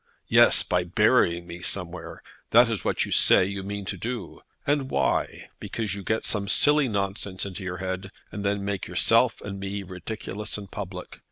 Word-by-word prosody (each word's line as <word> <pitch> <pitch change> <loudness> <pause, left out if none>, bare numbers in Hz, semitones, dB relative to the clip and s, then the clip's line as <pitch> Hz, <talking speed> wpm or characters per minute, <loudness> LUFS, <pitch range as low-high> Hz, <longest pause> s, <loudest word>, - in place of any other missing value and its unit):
"Yes; - - +6
by 90 0 0
burying 85 -2 +3
me 85 +1 -9
somewhere. 90 -1 -4 0.3
That 120 +1 +6
is 110 -5 -2
what - - 0
you - - -8
say 95 - +5
you 100 0 -4
mean 100 +1 -5
to - - -4
do. 115 -6 -5 0.2
And 140 -2 +1
why? - - -1
Because 110 -4 -3
you 100 - -5
get 110 +3 -1
some 100 -2 -1
silly 145 +5 +4
nonsense 100 -3 -3
into 100 0 -7
your 90 -1 -4
head, 95 +1 -4 0.2
and 100 - -5
then 100 0 -1
make 100 -1 -3
yourself - - +3
and 100 -1 -6
me 100 +1 -4
ridiculous 100 +3 -6
in 105 - -7
public. 95 -3 -7
100 Hz, 180 wpm, -26 LUFS, 95-105 Hz, 0.3 s, Yes